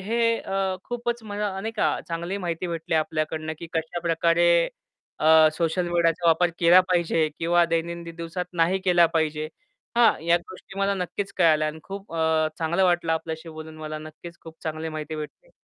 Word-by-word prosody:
हे 230 +3 +1
अ, 195 -1 -2
खूपच 240 -1 -3
म 215 -2 -8
नाही 205 +1 -2
का, - - +1
चांगली 170 +3 -3
माहिती 175 -1 -3
भेटली 165 0 -3
आपल्याकडनं 155 0 -1
की 170 - -7
कशाप्रकारे 170 +1 +1 0.7
अ, 155 0 +7
सोशल 170 +2 -1
मीडियाचा 170 0 +1
वापर 170 +2 +4
केला 175 +2 +7
पाहिजे 165 -3 +2
किंवा 170 +1 +3
दैनंदिन 170 0 -3
दिवसात 170 +2 -4
नाही 175 +3 +2
केला 175 -2 +5
पाहिजे. 155 -1 0 0.5
हां, 235 -1 +6
या 170 0 +4
गोष्टी 185 +2 -12
मला 200 0 +1
नक्कीच 195 +2 -4
कळाल्या 155 -3 +4
आणि 155 +1 -7
खूप 195 -2 -8
अ, 160 -1 +2
चांगलं 170 +3 +1
वाटलं 175 -2 +2
आपल्याशी 160 0 -4
बोलून 155 0 -9
मला 155 0 -5
नक्कीच 165 +2 -11
खूप 160 -1 -12
चांगली 155 0 -4
माहिती 155 0 -5
भेटली. 155 - -9
170 Hz, 165 wpm, -25 LUFS, 160-185 Hz, 0.7 s, अ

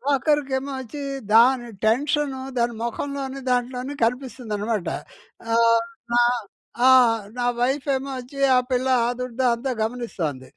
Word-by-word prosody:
ఆఖరికేమో 275 -1 0
వచ్చీ, 260 +3 -7 0.3
దాని 240 +1 +5 0.2
టెన్షను, 275 +3 +1 0.2
దాని 235 0 +1
మొఖంలోని, 275 +3 -4
దాంట్లోని 250 +2 -1
కనిపిస్తుందనమాట. 230 -5 -2 0.7
ఆహ్, 230 0 +4 0.3
నా 240 - +5 0.7
ఆ! - - +8 0.5
నా 245 - 0
వైఫేమో 270 +1 0
వచ్చి, 260 +3 -9 0.2
ఆ - - +6
పిల్ల 255 +1 +1 0.2
ఆదుర్ధా 250 +1 -2
అంతా 260 +2 -3
గమనిస్తోంది. 185 - -4
250 Hz, 110 wpm, -23 LUFS, 235-270 Hz, 0.7 s, ఆ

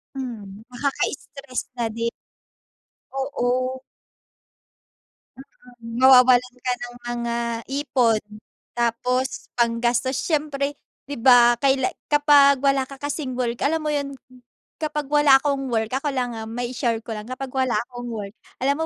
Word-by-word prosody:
Mm, 225 -5 -7
nakakastress 275 0 -3 0.2
na 230 - +1
din. 230 +1 -3 1.0
Oo. 270 -2 -2 2.3
Mm, 230 0 -7
mawawalan 250 -1 +6
ka 250 - +2
ng 245 0 -7
mga 235 -1 -2 0.3
ipon. 250 -6 +1 0.5
Tapos 250 +2 -1
panggastos 240 +2 +1
siyempre 290 -3 -1 0.3
di 285 -2 -5
ba 240 -1 +6
kaila 265 -1 +2 0.2
kapag 290 -2 +5
wala 275 -1 +2
ka 275 - -10
kasing 285 -3 -3
work, 240 -2 -2
alam 320 +2 +1
mo 305 - -1
yun? 280 -1 -2 0.7
Kapag 300 -1 -2
wala 295 -2 +6
akong 275 -1 -2
work 220 -1 -1
ako 275 +2 -1
lang, 250 -3 -2
ah, 220 -1 -6
mai-share 240 -1 -2
ko 225 - -4
lang. 215 +2 -7
Kapag 260 0 -6
wala 260 -2 +1
akong 245 -1 -7
work. 210 -3 -6 0.3
Alam 285 +4 +1
255 Hz, 125 wpm, -23 LUFS, 235-275 Hz, 2.3 s, mawawalan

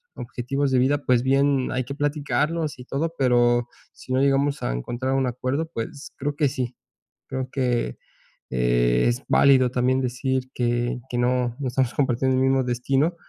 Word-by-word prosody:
objetivos 135 +3 -2
de 130 - +3
vida, 140 +3 +2
pues, 125 -1 +3
bien 135 0 +2
hay 130 0 -1
que 140 +2 -6
platicarlos 150 +1 -1
y 125 - -9
todo. 160 +5 -2
Pero 120 -2 +3 0.3
si 130 - -7
no 130 - +2
llegamos 140 +1 +2
a - - 0
encontrar 120 - -3
un 135 -1 +1
acuerdo, 130 +6 -2
pues, 115 +5 -6
creo 145 +1 -2
que 150 -2 +2
sí, 125 -3 -4 0.5
creo 130 -1 -4
que, 125 - -1 0.5
eh, - - +2
es 120 +3 -1
válido 130 -3 +5
también 125 +1 +1
decir 130 +1 -2
que 120 +1 0
que 120 - -2
no, 125 -1 +1
no 135 - -1
estamos 125 0 0
compartiendo 130 -1 +1
el 130 - +2
mismo 135 0 +2
destino. 135 +6 0
130 Hz, 170 wpm, -24 LUFS, 120-140 Hz, 0.5 s, válido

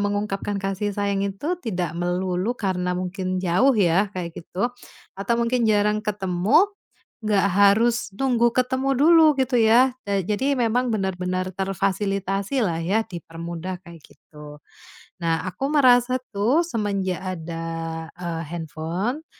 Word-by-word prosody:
mengungkapkan 205 0 -2
kasih 195 +1 -2
sayang 200 -1 0
itu 305 - -3
tidak 180 - -3
melulu 180 +5 -1
karena 180 -4 -1
mungkin 185 0 -3
jauh 185 +9 +3
ya 195 +1 +3
kayak 170 -2 -4
gitu, 190 +9 -3 0.4
atau 200 +4 -1
mungkin 235 0 +1
jarang 210 0 +2
ketemu, 210 - +2 0.5
nggak 205 -2 +2
harus 205 +4 +3
tunggu 240 -3 +3
ketemu 260 +2 0
dulu 315 -1 +6
gitu 260 -1 0
ya. 240 +2 +5 0.2
Eee, 195 -3 0
jadi 265 +7 0
memang 245 +1 +1
benar-benar 185 -3 -2
terfasilitasilah 195 +1 -1
ya, 210 +6 0
dipermudah 170 +1 -6
kayak 170 -2 -12
gitu. 150 -1 -14 0.6
Nah, 165 -2 0
aku 265 - -4
merasa 255 -3 +4
tuh 225 +10 +2
semenjak 200 - -2
ada, 170 -3 -5 0.5
eee, 170 -2 -4
handphone 170 - -4
200 Hz, 125 wpm, -23 LUFS, 180-235 Hz, 0.6 s, dulu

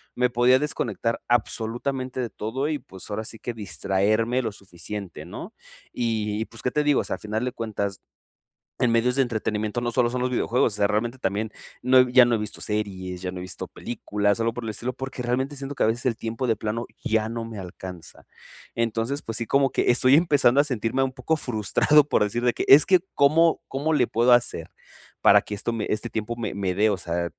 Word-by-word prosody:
me 125 0 +2
podía 125 +2 +4
desconectar 115 -5 -2
absolutamente 120 +2 -1
de 120 -2 -2
todo, 125 +8 -3
y 155 - -1
pues, 95 -6 -10
ahora 105 +1 -3
sí 115 - -7
que 120 - -4
distraerme 110 +3 0
lo 115 -3 -3
suficiente, 100 -1 -8
¿no? - - -8 0.4
Y, 110 -2 -1
pues, 115 - -11
¿qué 125 - -1
te 150 - +1
digo? 145 -1 +3
O - - -5
sea, - - -3
al - - -13
final 110 +3 -2
de 125 - -2
cuentas, 100 -4 -4 0.8
en 125 - +3
medios 120 +2 +2
de 135 - +3
entretenimiento, 110 -2 -1
no 120 0 -2
solo 120 0 +2
son 125 +1 -3
los 125 0 0
videojuegos, 120 -2 +1
o - - -2
sea, 100 -1 +3
realmente 115 +5 -1
también, 105 0 -2 0.3
no 130 0 +5
ya 125 0 +7
no 120 - +1
he 115 - +3
visto 105 - -6
series, 95 -4 -3
ya 95 - -3
no 90 - -8
he - - -5
visto 90 - -6
películas, 105 -3 -2
sólo 115 0 0
por 120 - -5
el 110 - -3
estilo, 120 +4 -4
porque 135 -1 -6
realmente, 130 +4 -1
siento 140 +1 -6
que - - 0
a - - +5
veces 120 +3 0
el 115 -3 0
tiempo, 115 +3 -3
de 115 - +2
plano, 110 +2 -3 0.2
ya 110 0 +1
no 115 0 -4
me 115 -2 -7
alcanza. 90 -1 -9 0.5
Entonces, 115 +4 -1
pues 115 -1 -3
sí, 115 - -1
como 135 +4 +3
que - - +2
estoy 130 +2 +5
empezando 145 -5 +4
a - - +1
sentirme 130 -1 -1
un 135 - -1
poco 135 +5 0
frustrado, 135 +5 +3
por - - +3
decir 120 +4 -2
de 120 - +3
que: - - -3
"Es 140 +3 +8
que, 185 -2 +6
¿cómo 160 +4 +4
cómo 150 +4 -1
le 125 -5 +3
puedo 120 +2 +2
hacer?, 120 -9 +1 0.5
para - - +7
que - - -7
esto 110 +3 -3
me 110 -2 -2
Este 115 +3 -2
tiempo 110 +1 -3
me 110 -4 -3
me 95 -2 -1
dé, 105 +3 +3
o 100 - 0
sea, 85 0 -2
115 Hz, 225 wpm, -25 LUFS, 105-125 Hz, 0.8 s, Es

